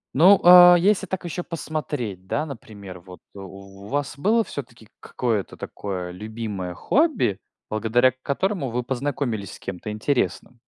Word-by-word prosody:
Ну, 185 Hz, +7 st, +6 dB
а, 180 Hz, 0 st, +10 dB
если 195 Hz, +3 st, +2 dB
так 190 Hz, -1 st, -4 dB
ещё 175 Hz, +1 st, -4 dB
посмотреть, 145 Hz, -, -5 dB
да, 150 Hz, +10 st, -1 dB
например, 105 Hz, -9 st, -10 dB
вот 90 Hz, 0 st, -13 dB
у 100 Hz, 0 st, -11 dB
вас 140 Hz, +2 st, -3 dB
было 220 Hz, +10 st, +2 dB
всё-таки 120 Hz, -, -9 dB
к -, -, -43 dB
какое-то 115 Hz, -6 st, -3 dB
такое 90 Hz, -3 st, -6 dB
любимое 105 Hz, -2 st, -6 dB
хобби, 265 Hz, -, +1 dB, 0.3 s
благодаря 115 Hz, +4 st, +2 dB
к 130 Hz, +1 st, -32 dB
которому 175 Hz, +1 st, -1 dB
вы 125 Hz, +1 st, -2 dB
познакомились 125 Hz, -5 st, -3 dB
с -, -, -12 dB
кем-то 95 Hz, +2 st, -7 dB
интересным? 120 Hz, +2 st, -2 dB
120 Hz, 145 wpm, -23 LUFS, 100-155 Hz, 0.3 s, а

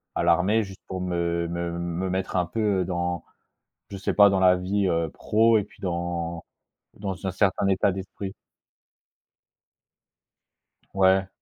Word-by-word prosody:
à -, -, 0 dB
l'armée, 95 Hz, +6 st, +3 dB
juste 95 Hz, -1 st, -11 dB
pour 95 Hz, -1 st, -5 dB
me 85 Hz, -1 st, -1 dB
me 85 Hz, 0 st, -3 dB
me 85 Hz, +2 st, -2 dB
mettre 95 Hz, +1 st, -2 dB
un 90 Hz, -1 st, +2 dB
peu 100 Hz, 0 st, 0 dB
dans, 85 Hz, -1 st, -2 dB, 0.7 s
je 100 Hz, -, -7 dB
sais 95 Hz, -, -2 dB
pas, 100 Hz, -1 st, +7 dB
dans 95 Hz, -1 st, +1 dB
la 90 Hz, -1 st, +5 dB
vie, 95 Hz, +1 st, 0 dB
heu, 85 Hz, -1 st, 0 dB
pro, 110 Hz, +5 st, +3 dB
et 105 Hz, -, +1 dB
puis -, -, -19 dB
dans 85 Hz, -2 st, -3 dB, 0.5 s
dans 95 Hz, -2 st, -4 dB
un 95 Hz, -, 0 dB
certain 95 Hz, 0 st, +1 dB
état 95 Hz, 0 st, +2 dB
d'esprit. 95 Hz, 0 st, -6 dB, 2.6 s
Ouais. 95 Hz, 0 st, +4 dB
95 Hz, 145 wpm, -25 LUFS, 85-95 Hz, 2.6 s, pas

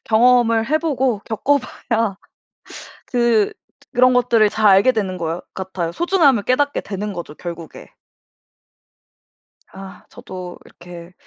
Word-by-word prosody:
경험을 230 Hz, 0 st, +3 dB
해 310 Hz, -, +3 dB
보고 265 Hz, -9 st, -1 dB
겪어 280 Hz, +6 st, +1 dB
봐야 230 Hz, -5 st, -3 dB, 0.9 s
그 235 Hz, -4 st, +1 dB, 0.3 s
또 285 Hz, -, -28 dB
그런 255 Hz, 0 st, +4 dB
것들을 235 Hz, -3 st, +3 dB
잘 215 Hz, 0 st, +1 dB
알게 200 Hz, +6 st, +5 dB
되는 195 Hz, -6 st, -3 dB
것 165 Hz, 0 st, -4 dB
같아요. 185 Hz, -3 st, -4 dB
소중함을 305 Hz, -, +2 dB
깨닫게 285 Hz, +6 st, 0 dB
되는 205 Hz, +1 st, -5 dB
거죠 175 Hz, -4 st, -7 dB
결국에. 170 Hz, -2 st, -9 dB, 1.8 s
아 190 Hz, 0 st, -12 dB
저도 180 Hz, -1 st, -9 dB
이렇게 175 Hz, 0 st, -13 dB
220 Hz, 245 characters per minute, -19 LUFS, 185-250 Hz, 1.8 s, 알게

